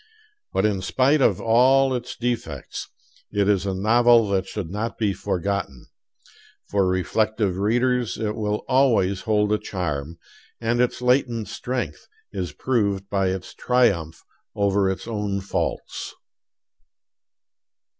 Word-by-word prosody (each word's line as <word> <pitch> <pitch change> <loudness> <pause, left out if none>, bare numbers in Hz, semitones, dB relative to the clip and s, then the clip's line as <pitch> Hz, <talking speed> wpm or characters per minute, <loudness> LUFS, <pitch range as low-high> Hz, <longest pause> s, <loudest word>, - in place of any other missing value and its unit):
But 95 - +1
in 100 -3 +1
spite 135 +9 +2
of - - +3
all 130 +4 +4
its 125 -1 -4
defects 120 -1 -4 0.4
it 100 -1 +1
is 100 -1 +2
a 95 - -1
novel 115 +3 +4
that 95 -1 0
should 95 -6 -5
not 110 +3 -3
be 105 -3 +1
forgotten. 90 -9 -3 0.9
For 100 -2 +2
reflective 95 +2 0
readers 120 +3 +1
it 105 -2 -2
will 105 -1 -2
always 115 -8 +3
hold 105 -1 +1
a 105 - +1
charm, 80 -4 -4 0.4
and 120 +1 +1
its 125 0 0
latent 125 -4 +1
strength 120 - -4 0.3
is 90 -3 -3
proved 100 -6 -1
by 95 -2 +1
its 95 0 -4
triumph 100 -11 +1 0.3
over 100 -1 +2
its 95 +3 -4
own 105 -3 -2
faults. 95 - -3
105 Hz, 125 wpm, -23 LUFS, 95-120 Hz, 0.9 s, all